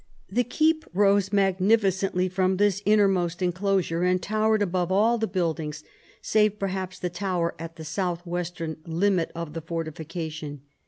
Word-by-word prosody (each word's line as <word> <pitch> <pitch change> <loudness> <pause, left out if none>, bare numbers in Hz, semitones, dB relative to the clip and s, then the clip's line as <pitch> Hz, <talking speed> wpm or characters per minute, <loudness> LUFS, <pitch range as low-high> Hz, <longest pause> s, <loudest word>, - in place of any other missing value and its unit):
The 245 +5 +2
keep 315 +6 +1
rose 200 0 +3
magnificently 195 -1 +2
from 185 0 +1
this 200 -1 +2
innermost 195 -5 +3
enclosure, 180 -2 0
and 180 0 +2
towered 215 +2 +1
above 180 -2 -1
all 225 +5 +3
the 220 - 0
buildings, 160 -5 -2 0.4
save 210 -1 +2
perhaps 190 -2 -3
the 180 - -3
tower 175 -2 -1
at 165 0 -7
the 160 - -9
south 175 +2 -2
western 170 -2 -4
limit 175 +1 +1
of 165 -2 -5
the 165 - -4
fortification. 160 -2 -5
185 Hz, 145 wpm, -26 LUFS, 170-200 Hz, 0.4 s, rose